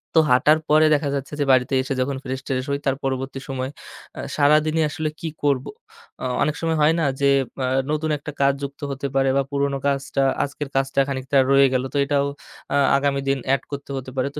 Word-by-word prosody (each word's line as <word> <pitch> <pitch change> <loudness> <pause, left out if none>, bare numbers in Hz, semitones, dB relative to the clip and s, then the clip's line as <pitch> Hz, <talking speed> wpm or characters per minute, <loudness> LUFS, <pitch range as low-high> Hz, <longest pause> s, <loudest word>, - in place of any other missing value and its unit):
তো - - +7
হাঁটার 150 +5 +5
পরে 155 +1 +5
দেখা 145 -1 +1
যাচ্ছে 140 +1 -5
যে, - - +2
বাড়িতে 130 +1 +3
এসে 135 +1 -3
যখন 135 +1 -1
ফ্রেশ-ট্রেশ 130 0 -3
হয় 140 0 -1
তার 135 - +2
পরবর্তী 135 0 -3
সময় 130 -1 -3 0.5
এ্যাঁ - - -6
সারাদিনই 155 +2 +3
আসলে 155 +1 -3
কি 165 - -4 0.2
করব। 140 -3 +1 0.5
এ্যাঁ 130 -1 -2
অনেক 150 0 +1
সময় 165 -1 0
হয় 150 +2 +5
না, - - +1 0.2
যে - - +3 0.3
এ্যাঁ 130 0 +1
নতুন 155 +1 -1
একটা 145 +1 -7
কাজ 140 0 +4
যুক্ত 140 0 -6
হতে 140 +1 -3
পারে 135 0 +3
বা - - +4
পুরনো 140 -1 0
কাজটা 140 0 0 0.2
আজকের 140 0 -5
কাজটা 135 +1 +1
খানিকটা 135 0 -1
রয়ে 140 0 +6
গেল। 130 0 +1
তো - - 0
এটাও 140 0 +1 0.5
এ্যাঁ 140 -1 +3
আগামী 140 0 0
দিন 135 - +2 0.2
এড 135 - +1
করতে 140 0 -6
হতে 130 0 -7
পারে। 130 +1 0
তো - - -4
140 Hz, 210 wpm, -22 LUFS, 135-145 Hz, 0.5 s, তো